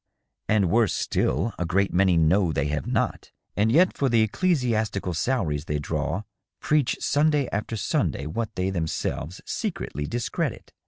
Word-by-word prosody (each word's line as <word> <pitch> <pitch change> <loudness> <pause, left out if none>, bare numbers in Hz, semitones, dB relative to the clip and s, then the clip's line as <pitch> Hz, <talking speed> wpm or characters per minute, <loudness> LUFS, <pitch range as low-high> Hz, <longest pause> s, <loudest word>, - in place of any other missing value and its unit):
" - - -57
And 100 -5 +3
worse 115 -1 +3
still, 115 - 0
a 90 - 0
great 95 +3 +1
many 90 -1 +4
know 85 +3 +3
they 70 -2 0
have 75 -2 -2
not, - - -1 0.2
and 105 +2 +2
yet 180 +8 +4
for 135 - +1
the 115 -2 +4
ecclesiastical 110 - 0
salaries 80 - -1
they 75 - -1
draw 85 +7 -2 0.4
preach 150 -4 +1
Sunday 145 -1 +2
after 105 +3 -2
Sunday 80 -6 -1
what 105 +9 -3
they 95 0 -1
themselves 85 -1 -3
secretly 75 0 -3
discredit. 120 0 -3
100 Hz, 155 wpm, -25 LUFS, 85-120 Hz, 0.4 s, many